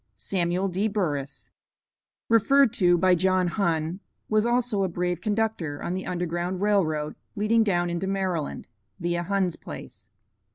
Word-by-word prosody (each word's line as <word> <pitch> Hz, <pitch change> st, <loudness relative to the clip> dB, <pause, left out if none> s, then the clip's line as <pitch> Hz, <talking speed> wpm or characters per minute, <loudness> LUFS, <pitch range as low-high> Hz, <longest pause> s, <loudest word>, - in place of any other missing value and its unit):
'" 105 Hz, -, -46 dB
SAMUEL 180 Hz, +1 st, +1 dB
D. 190 Hz, +4 st, 0 dB
BURRIS, 150 Hz, -10 st, -3 dB, 0.8 s
Referred 235 Hz, +2 st, +4 dB
to 175 Hz, -6 st, +4 dB
by 185 Hz, +1 st, +4 dB
John 185 Hz, 0 st, +2 dB
Hunn, 170 Hz, -2 st, -1 dB, 0.3 s
was 215 Hz, +1 st, +2 dB
also 240 Hz, -4 st, +1 dB
a -, -, +1 dB
brave 175 Hz, 0 st, -2 dB
conductor 210 Hz, -9 st, -1 dB
on 175 Hz, -, -2 dB
the 190 Hz, +1 st, -4 dB
Underground 175 Hz, +1 st, -2 dB
Rail 205 Hz, -1 st, +3 dB
Road 155 Hz, -1 st, -2 dB, 0.2 s
leading 220 Hz, +2 st, +3 dB
down 175 Hz, -4 st, +1 dB
into 175 Hz, +3 st, -2 dB
Maryland 190 Hz, -6 st, -2 dB, 0.3 s
(via 175 Hz, 0 st, -1 dB
Hunn's 185 Hz, -1 st, 0 dB
place). -, -, -10 dB
185 Hz, 150 wpm, -26 LUFS, 175-205 Hz, 0.8 s, Referred